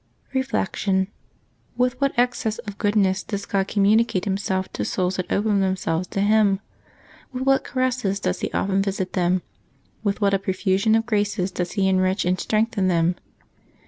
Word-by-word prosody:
Reflection. 200 -7 0 0.3
— - - -38
^With 250 0 +2
what 275 -2 0
excess 240 -3 +1
of 205 -2 -8
goodness 205 -2 +2
does 200 -2 -5
God 195 -1 0
communicate 210 0 +2
Himself 190 -1 -2
to - - -2
souls 185 0 -1
that 185 - -4
open 205 0 +2
themselves 185 -2 0
to 195 - -2
Him! 205 -1 +3 0.7
With 255 0 -3
what 270 0 +3
caresses 255 -6 -1
does - - -1
He - - -3
often 195 0 +1
visit 195 -2 -2
them! 180 -1 +1 0.6
With 200 -1 0
what 200 -2 +2
a 195 - +3
profusion 195 +2 +1
of 225 0 +1
graces 205 -4 0
does 180 -1 -3
He 195 -2 +1
enrich 185 0 +2
and 180 +1 +1
strengthen 215 -3 +1
them! 170 -1 +2
200 Hz, 165 wpm, -23 LUFS, 190-220 Hz, 0.7 s, Him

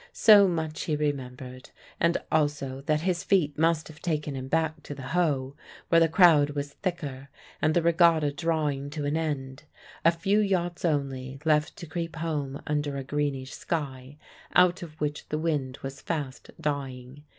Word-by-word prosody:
So 205 -3 +7
much 160 -3 -2
he 155 - 0
remembered, 130 -3 -4 0.3
and 170 0 +3
also 145 -3 0
that 155 0 +2
his 180 0 0
feet 160 -8 +2
must 160 0 +1
have 155 0 -13
taken 150 -4 -2
him 130 0 -5
back 160 +2 0
to 145 - -8
the 135 - -9
Hoe, 140 -6 +1 0.3
where 165 - +6
the 165 - +6
crowd 160 -4 +6
was 145 0 -4
thicker 140 -8 -4 0.3
and 155 0 +2
the 170 - +3
regatta 165 -3 +4
drawing 145 -2 -1
to 150 -2 -3
an 145 +2 0
end 145 -3 -3 0.4
a 165 - +6
few 195 +5 +1
yachts 180 -4 0
only 135 -4 -1
left 150 -1 +2
to - - -8
creep 165 +1 -4
home 150 -4 -3
under 145 -1 -1
a 135 - -4
greenish 140 -1 -2
sky, 140 -4 -4 0.4
out 180 0 +5
of 160 -3 -10
which 150 -1 -3
the 150 - -1
wind 150 -5 -1
was 135 0 -6
fast 145 -6 -4
dying. 140 -3 -4
150 Hz, 170 wpm, -27 LUFS, 140-165 Hz, 0.4 s, So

